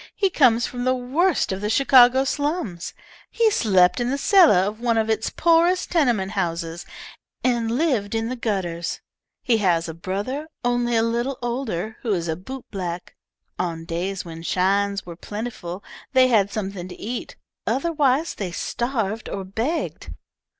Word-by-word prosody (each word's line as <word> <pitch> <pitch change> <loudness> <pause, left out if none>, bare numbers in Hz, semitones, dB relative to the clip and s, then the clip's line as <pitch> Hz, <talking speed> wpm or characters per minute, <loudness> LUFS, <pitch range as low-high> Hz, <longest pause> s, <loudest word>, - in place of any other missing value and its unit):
He 390 -2 +1
comes 240 -8 +4
from 245 -1 -5
the 255 +1 +2
worst 280 - +1
of 190 +1 -3
the 210 - -1
Chicago 260 +1 +6
slums. 285 - -2 0.3
He 455 -2 +2
slept 185 - +3
in 240 0 0
the 275 - 0
cellar 345 - +6
of 210 +2 -4
one 235 -1 +1
of 220 0 +1
its 220 0 0
poorest 340 +2 +2
tenement 240 - +2
houses, 170 -3 -3 0.6
and 240 -3 +1
lived 235 -6 0
in 225 0 -1
the 255 - -3
gutters. 185 -8 -2 0.4
He 235 -3 +3
has 175 -5 +1
a 160 - -5
brother 205 - -4 0.2
only 245 -1 +1
a 225 - +3
little 240 +3 -1
older, 225 -5 -3
who 225 -4 0
is 170 -3 -2
a 160 - -1
bootblack. 185 -4 -6 0.4
On 165 -2 -3
days 180 +3 -3
when 165 -1 -8
shines 200 +3 +1
were 170 -1 -8
plentiful 205 -2 -6 0.3
they 260 -1 +5
had 205 -4 +3
something 195 -3 -4
to 180 - -11
eat, 240 +3 -5 0.3
otherwise 295 0 +1
they 190 -4 -4
starved 225 +1 -2
or 195 - -4
begged." 225 - -3
225 Hz, 155 wpm, -23 LUFS, 190-255 Hz, 0.6 s, Chicago